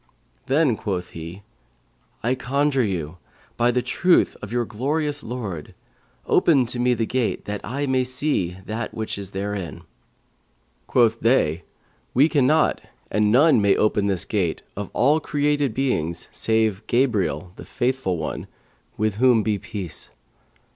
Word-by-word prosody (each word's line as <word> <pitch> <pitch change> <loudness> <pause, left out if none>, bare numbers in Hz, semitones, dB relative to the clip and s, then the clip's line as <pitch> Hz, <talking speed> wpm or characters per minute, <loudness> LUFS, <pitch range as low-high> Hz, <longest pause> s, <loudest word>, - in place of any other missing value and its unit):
Then 135 -4 +3
quoth 90 -4 -3
he, 85 +4 -8 0.8
'I 120 +3 +2
conjure 135 +1 +1
you, 90 -5 -3 0.4
by 120 +1 +2
the 125 0 +1
truth 180 -1 +3
of - - -7
your 120 0 0
glorious 145 +6 -1
Lord, 110 - -6 0.5
open 140 -7 +4
to 120 - -4
me 125 0 +3
the 115 - 0
gate, 125 0 -1
that 105 -1 -4
I 140 +6 -2
may 130 -1 +2
see 125 - -1
that 110 +2 -4
which 110 -2 -3
is 100 -2 -6
therein.' 100 -2 -4 1.0
Quoth 115 -2 +3
they, 90 -9 +2 0.5
'We 140 +6 +5
cannot, 150 +1 +3 0.3
and 105 0 +2
none 140 0 +5
may 100 -1 +4
open 105 -1 +2
this 95 -3 0
gate, 90 -7 -1
of 105 -1 -5
all 145 +5 +3
created 145 -2 0
beings 85 - -1
save 110 -3 +1
Gabriel, 100 - 0
the - - -10
Faithful 125 -7 -1
One, 80 - -4 0.5
with 105 -1 0
whom 120 -2 +4
be 105 -2 0
peace!' 105 -5 -6
115 Hz, 140 wpm, -23 LUFS, 100-130 Hz, 1.0 s, We